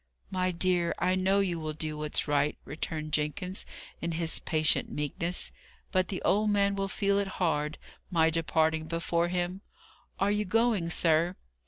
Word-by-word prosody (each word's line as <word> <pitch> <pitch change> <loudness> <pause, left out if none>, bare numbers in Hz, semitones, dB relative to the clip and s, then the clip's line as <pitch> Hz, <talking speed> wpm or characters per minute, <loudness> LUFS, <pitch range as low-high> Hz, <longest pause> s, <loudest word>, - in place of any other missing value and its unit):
"My 185 -1 +1
dear, 175 -1 +2
I 180 +1 +2
know 190 +2 +3
you 175 -4 0
will 155 -1 -3
do 155 0 -3
what's 150 0 -1
right," 145 0 +1
returned 155 0 -4
Jenkins, 165 +6 -2 0.3
in 170 0 -2
his 165 0 0
patient 155 -1 +1
meekness: 165 +4 -2 0.4
"but 185 0 +2
the 190 - -4
old 210 +1 +3
man 200 -1 +2
will 195 0 -1
feel 200 0 +1
it 200 - 0
hard, 155 -3 0 0.3
my 165 -3 +3
departing 160 -1 +1
before 170 +1 0
him. 180 +2 -2 0.6
Are 195 +1 +2
you 210 +1 +1
going, 215 -3 +2
sir?" 170 +1 +3
170 Hz, 160 wpm, -29 LUFS, 160-190 Hz, 0.6 s, know